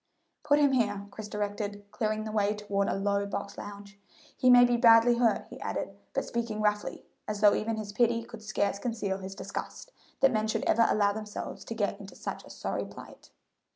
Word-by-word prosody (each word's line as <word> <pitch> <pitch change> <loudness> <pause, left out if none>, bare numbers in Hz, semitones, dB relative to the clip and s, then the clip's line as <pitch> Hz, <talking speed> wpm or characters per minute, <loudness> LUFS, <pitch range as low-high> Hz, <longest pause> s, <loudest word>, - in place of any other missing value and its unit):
"Put 295 -1 +4
him 290 -2 +4
here," 205 -6 +1
Chris 215 +1 -7
directed, 205 0 -3
clearing 215 -2 -1
the 215 - -5
way 210 -1 +1
toward 200 -1 -1
a - - 0
low 200 +1 0
box 200 0 -5
lounge. 200 0 -9 0.4
"He 255 - +3
may 245 0 +9
be 245 0 +2
badly 235 0 +6
hurt," 230 -3 +2
he - - -10
added, - - -3 0.2
but - - 0
speaking 230 -2 -3
roughly, 210 -1 -1 0.2
as 210 -1 -3
though 210 -1 +7
even 225 +1 -1
his 210 -2 -6
pity 230 0 +2
could 230 -1 -11
scarce 205 -2 -1
conceal 215 -5 -2
his 190 0 -7
disgust - - -6 0.3
that 270 - +6
men 215 0 +1
should 220 0 -1
ever 230 +1 +4
allow 205 -1 +3
themselves 210 0 -6
to 230 - -5
get 205 -2 -1
into 200 -1 -11
such - - -6
a - - -14
sorry - - -3
plight. - - -12
215 Hz, 200 wpm, -29 LUFS, 205-230 Hz, 0.4 s, may